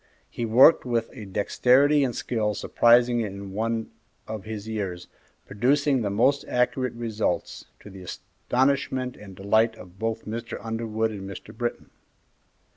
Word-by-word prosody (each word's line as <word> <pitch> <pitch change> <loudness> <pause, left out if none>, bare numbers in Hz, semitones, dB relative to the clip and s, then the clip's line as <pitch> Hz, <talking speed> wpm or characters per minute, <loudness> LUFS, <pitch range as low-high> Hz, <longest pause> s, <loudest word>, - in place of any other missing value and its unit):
He 120 - -3
worked 130 +8 +6
with 115 -2 -1
a 110 -6 -9
dexterity 130 +9 +3
and 125 -4 -1
skill 105 -3 -1
surprising 120 +2 +4
in 100 -2 -6
one 115 +2 -2 0.4
of 110 -2 -6
his 110 -1 -6
years, 95 -5 -4 0.4
producing 135 +5 +1
the 105 - -1
most 120 +8 +2
accurate 125 0 0
results, 110 -5 -2 0.2
to 105 - -12
the 95 -1 -11
astonishment 130 +6 -1
and 100 -2 -12
delight 110 +4 +2
of 90 -3 -14
both 115 0 -3
Mr. 115 +2 -5
Underwood 115 -1 -2
and 100 -2 -7
Mr. 100 +3 -10
Britton. 120 +1 -4
115 Hz, 140 wpm, -25 LUFS, 105-125 Hz, 0.4 s, worked